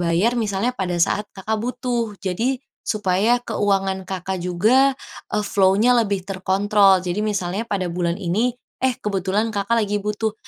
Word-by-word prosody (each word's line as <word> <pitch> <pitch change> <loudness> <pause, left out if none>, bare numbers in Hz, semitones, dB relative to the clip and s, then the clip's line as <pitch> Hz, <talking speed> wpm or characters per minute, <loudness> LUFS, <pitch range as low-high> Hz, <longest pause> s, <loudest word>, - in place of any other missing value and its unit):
bayar 175 +8 +2
misalnya 215 +1 0
pada 180 -4 -2
saat 210 +4 +1
Kakak 215 +3 -2
butuh. 240 -2 -2
Jadi, 230 +8 -1 0.3
supaya 210 +3 +2
keuangan 195 -4 0
Kakak 190 0 -4
juga, 220 +10 +3 0.4
eee, 210 - +1
flow-nya 205 +5 +3
lebih 200 -3 -2
terkontrol. 195 0 +3
Jadi 180 +3 -2
misalnya 200 0 -2
pada 195 -5 -1
bulan 170 0 -1
ini, 210 +6 0 0.3
eh 260 -1 +2
kebetulan 200 +2 -1
Kakak 205 +3 +1
lagi 205 0 -1
butuh, 210 +1 -2
200 Hz, 145 wpm, -21 LUFS, 190-225 Hz, 0.4 s, juga